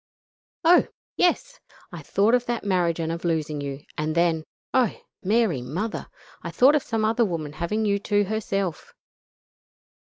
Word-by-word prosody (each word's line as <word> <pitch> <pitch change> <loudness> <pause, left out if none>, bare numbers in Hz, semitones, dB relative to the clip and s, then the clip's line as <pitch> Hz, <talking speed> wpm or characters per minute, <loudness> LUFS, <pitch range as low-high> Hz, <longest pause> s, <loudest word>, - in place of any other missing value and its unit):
"Oh! 345 +2 +6 0.3
yes! - - +1 0.3
I 170 -2 -8
thought 200 +9 +2
of 245 -1 +2
that 240 -1 -2
marriage 180 -4 +1
and 165 0 -1
of 165 0 -5
losing 155 -3 -1
you, 140 0 -5 0.2
and 155 +1 -1
then, 165 -2 +2 0.3
oh! 255 -4 +2 0.2
Mary 205 - +1
Mother! 180 - -4 0.3
I - - -5
thought 265 +4 +5
of 300 - +3
some 225 -3 -1
other 225 +2 +2
woman 165 -7 -3
having 190 +8 -1
you 200 -1 +1
to 205 0 +1
herself. 195 -4 -3
195 Hz, 155 wpm, -25 LUFS, 165-225 Hz, 0.3 s, Oh